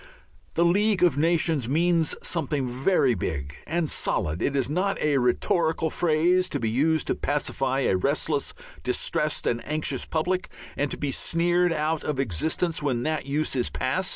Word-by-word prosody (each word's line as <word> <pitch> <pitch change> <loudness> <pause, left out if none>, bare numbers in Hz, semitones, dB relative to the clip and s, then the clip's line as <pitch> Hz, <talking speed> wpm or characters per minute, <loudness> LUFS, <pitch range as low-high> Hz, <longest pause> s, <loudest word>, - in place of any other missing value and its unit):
The 170 - +3
League 200 +2 +2
of 175 - +5
Free 145 - -1
Nations 160 -6 +1
means 165 +1 +2
something 145 -5 -1
very 130 +2 +2
big 70 -8 -3
and 170 0 0
solid; 80 - -1
it 140 - 0
is 135 -3 +1
not 185 +7 0
a 145 -2 +2
rhetorical 160 +6 +1
phrase 175 +3 +2
to 145 - -2
be 115 -2 -1
used 155 +6 +2
to - - 0
pacify 135 -2 -1
a 95 - +2
restless, 140 - -1 0.3
distressed, - - -1
and 120 0 0
anxious 150 -4 -2
public, 180 +3 -1 0.3
and 145 - -1
to - - -4
be 145 -2 -2
sneered 175 +4 +1
out 155 0 -1
of 150 -3 -2
existence 150 - -1
when 130 -5 -1
that 155 -2 -2
use 145 +1 -1
is 125 -2 0
past. 185 +9 -1
155 Hz, 170 wpm, -25 LUFS, 135-170 Hz, 0.3 s, of